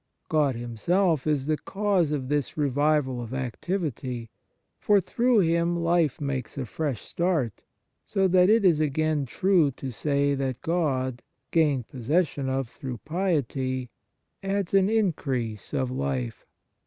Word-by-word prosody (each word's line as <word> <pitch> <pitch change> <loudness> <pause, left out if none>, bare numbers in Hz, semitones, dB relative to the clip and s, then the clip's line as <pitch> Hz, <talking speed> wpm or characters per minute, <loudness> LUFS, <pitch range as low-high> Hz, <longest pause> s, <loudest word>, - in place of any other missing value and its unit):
God 150 -5 +2
Him 120 -1 -6
self 170 - +2
is 145 -3 +1
the 155 +1 +1
cause 195 -6 0
of 140 -4 -2
this 145 0 -1
revival 145 -2 +1
of 120 +2 -6
activity; 130 - -3 0.5
for 205 -1 +4
through 235 +4 +2
Him 170 0 +2
life 170 -3 +1
makes 135 -4 -3
a 135 - -2
fresh 140 -1 -3
start, 165 - -1 0.4
so 195 -1 +1
that 180 +1 +5
it 220 -1 +4
is 170 -5 +5
again 155 -1 0
true 180 +1 +3
to 130 +1 -6
say 140 +3 +1
that 135 -2 -3
God, 130 -7 0 0.3
gained 145 -7 +2
possession 140 +2 0
of 135 -1 -1
through 125 +1 -7
piety, 135 - -1 0.5
adds 195 -1 -2
an 195 0 +4
increase 135 - -1
of 130 -1 -1
life. 70 - -3
145 Hz, 140 wpm, -26 LUFS, 130-175 Hz, 0.5 s, that